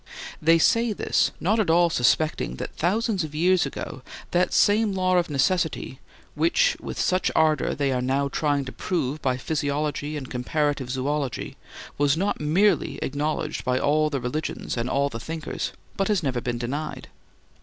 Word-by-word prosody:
They 165 +2 +5
say 230 +6 +3
this, - - +1
not 210 +6 +1
at 210 - +1
all 170 +1 +4
suspecting 120 - +1
that - - -6
thousands 200 +2 0
of 150 -1 -7
years 180 0 +3
ago 130 - -7 0.3
that 180 +1 +2
same 210 0 +3
law 185 -1 +1
of 175 -1 +1
necessity 175 +6 0 0.3
which - - +2
with - - -6
such 185 0 +1
ardor 155 -2 +2
they 140 -1 0
are 125 -1 0
now 135 +2 +1
trying 145 -1 0
to 130 - -6
prove 150 -4 -2
by 130 -2 0
physiology 145 +1 -2
and 135 -3 -6
comparative 140 +1 -1
zoology 135 +1 -2 0.4
was 145 +1 +3
not 195 -1 -1
merely 155 -1 +2
acknowledged 145 +3 -2
by 125 0 +1
all 155 +3 +2
the 140 -2 -2
religions 125 +6 -3
and 120 +1 -2
all 140 +1 +2
the 115 - -6
thinkers, 160 +5 -4 0.3
but 195 - +1
has 205 -5 +1
never 130 -4 -1
been 120 0 -2
denied. 140 +6 -4
150 Hz, 165 wpm, -25 LUFS, 135-175 Hz, 0.4 s, They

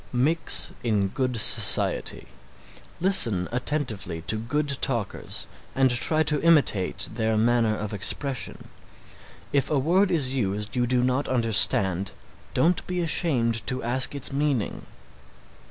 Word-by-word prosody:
Mix 145 +7 +1
in 105 -4 -1
good 125 +2 -3
society. 110 - +3 0.7
Listen 115 - +3
attentively 120 - -3
to 95 - +2
good 140 +5 -1
talkers 120 -7 -1 0.3
and 130 -1 +2
try 155 +6 +1
to 150 -1 -1
imitate 145 - +2
their 110 -1 -1
manner 115 -1 +1
of 105 0 -6
expression. 130 +6 0 0.8
If 140 -2 0
a 150 - 0
word 180 +8 +1
is 145 -7 0
used 105 -2 -3
you 125 -1 0
do 125 0 +1
not 130 +3 -1
understand, 100 -6 +1 0.4
don't 170 +1 +1
be 180 0 -3
ashamed 125 -9 -1
to 130 0 0
ask 130 +3 -1
its 140 - -2
meaning. 140 -6 -3
125 Hz, 125 wpm, -24 LUFS, 110-145 Hz, 0.8 s, society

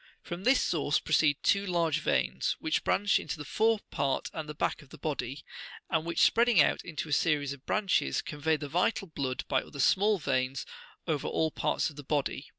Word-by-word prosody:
From 175 +2 -7
this 260 +1 +5
source 145 -3 +1
proceed 155 -2 +2
two 200 0 +3
large 170 -5 0
veins, 65 - 0
which 155 - -1
branch 205 0 +2
into - - -5
the 150 - -7
fore 220 +5 +1
part 135 -1 -1
and 155 -2 -5
the 150 - -6
back 155 - -1
of 145 - -18
the - - -12
body, 140 -3 -4 0.5
and 160 -1 +1
which, 170 -1 0
spreading 235 -4 +4
out - - +3
in 160 -3 -10
a - - -8
series 145 -3 +1
of 140 0 -15
branches, 205 -3 +1
convey 155 +1 -1
the 145 -1 -6
vital 180 +7 0
blood 135 -6 -3
by 130 -2 +1
other 140 - -11
smaller 205 +9 +3
veins 130 -4 -1 0.4
over 155 -4 -1
all 160 -1 0
parts - - -1
of 145 - -17
the 145 - -8
body. 145 0 -2
155 Hz, 200 wpm, -30 LUFS, 145-180 Hz, 0.5 s, this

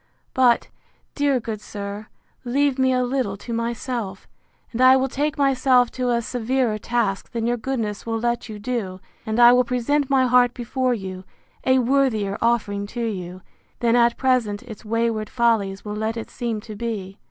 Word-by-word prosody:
—But, 250 -2 +3 0.4
dear 285 -3 +1
good 220 -2 -5
sir, 205 +1 -7 0.4
leave 270 +2 +1
me 260 0 +3
a 250 -1 +2
little 245 -6 -1
to 235 +4 -7
myself, 230 -3 -3 0.4
and 235 - -3
I 260 +1 +8
will 265 0 +1
take 295 +4 -2
myself 260 -3 +3
to 255 -1 -2
a 235 -1 +1
severer 245 -1 -1
task 220 -4 -1
than 230 -2 -2
your 240 +1 +1
goodness 220 -4 -3
will 225 -1 -2
let 235 0 -1
you 215 - -6
do 205 -4 -3 0.3
and 220 +2 -1
I 240 0 +9
will 250 0 +5
present 255 +4 0
my 265 -2 +4
heart 250 0 +4
before 250 +1 -1
you, 190 -3 -7 0.4
a 260 0 +4
worthier 245 -6 +1
offering 210 -4 0
to 235 - 0
you, 185 -4 -5 0.4
than 235 -1 +2
at 235 -1 +3
present 250 -6 +1
its 225 -5 -10
wayward 225 -1 -1
follies 220 -5 +1
will 210 0 -4
let 220 +2 -2
it 225 - -6
seem 230 -3 -3
to 215 -1 -9
be. 205 -3 -5
235 Hz, 175 wpm, -23 LUFS, 215-255 Hz, 0.4 s, I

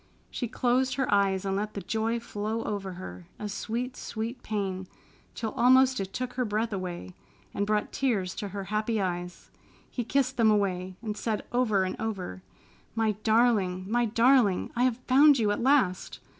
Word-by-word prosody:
She 245 - -3
closed 255 +2 +1
her 265 -5 0
eyes 195 -1 +2
and 195 0 0
let 210 +2 -3
the 200 - -3
joy 225 +2 -1
flow 220 0 -3
over 195 -3 -4
her, 90 - -9
a 210 - -5
sweet, 240 +5 -3
sweet 225 +3 -5
pain, 190 -3 -3 0.5
till 220 -2 -3
almost 260 +2 +5
it 195 -1 -4
took 250 +2 -4
her 255 - 0
breath 220 0 -1
away, 175 - -5 0.4
and 200 0 -1
brought 210 0 0
tears 205 -9 0
to 205 - -3
her 200 0 -5
happy 215 +1 0
eyes. 180 -2 -4 0.4
He 245 - -2
kissed 265 +2 0
them 225 -2 +5
away, 190 -3 0
and 215 -2 -3
said 215 0 -2
over 230 -6 +2
and 185 - -2
over, 190 - -4 0.5
"My 225 -1 +2
darling! 215 -5 +2
My 240 +3 +2
darling! 230 -3 +3
I 245 +1 +3
have 250 -3 +1
found 280 +2 +7
you 215 -4 +2
at 205 - -1
last!" 255 -9 +2
215 Hz, 175 wpm, -28 LUFS, 195-240 Hz, 0.5 s, found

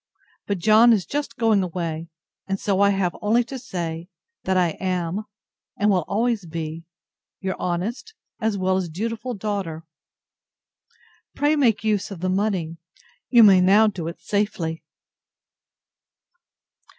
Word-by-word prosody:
But 200 - -1
John 220 +6 +6
is 200 -5 0
just 290 0 -4
going 220 -4 +3
away; 170 -2 -4 0.4
and 195 0 -2
so 195 -2 0
I 200 - +5
have 195 -3 0
only 225 +3 +3
to 260 +3 -7
say, 170 -7 -5 0.4
that 190 0 +1
I 180 -2 +3
am, 185 +2 -2 0.5
and 210 0 +3
will 180 -5 +1
always 220 -2 0
be, 160 0 -5 0.5
Your 190 -1 -3
honest 215 - -3 0.2
as 220 -3 0
well 185 0 +1
as 185 -3 -2
dutiful 230 +7 -4
DAUGHTER. 190 -6 -4 1.5
Pray 295 +2 +2
make 235 -8 +2
use 215 -1 0
of 195 -4 -8
the 185 +2 -1
money. 185 -4 -1 0.5
You 240 -2 +7
may 195 -3 +7
now 200 +4 +6
do 190 -6 -2
it 170 - -6
safely. 195 -6 -2
195 Hz, 140 wpm, -23 LUFS, 175-220 Hz, 1.5 s, You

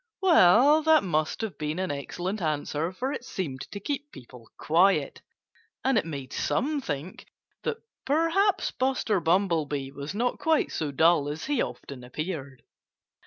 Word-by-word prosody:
Well, 290 - +6
that 315 -1 +5
must 155 -2 -1
have 220 -5 -5
been 150 +2 -2
an 185 -2 -1
excellent 180 +8 -4
answer, 155 +1 -1
for 255 +8 -3
it - - -5
seemed 150 - -5
to 200 - -5
keep 290 +7 -4
people 125 -3 -14
quiet. 180 +5 +2 0.6
And 265 0 +2
it 210 - +1
made 140 -5 -6
some 285 +5 0
think 150 - -6 0.3
that 460 - -2 0.3
perhaps 330 +8 +2
Buster 255 -6 0
Bumblebee 160 -6 0
was 140 +6 -7
not 245 +3 -1
quite 320 -1 +1
so 155 - -2
dull 160 0 +3
as 150 +2 -5
he 290 -4 0
often 130 -3 -6
appeared. 140 0 -6
180 Hz, 150 wpm, -27 LUFS, -, 0.6 s, Well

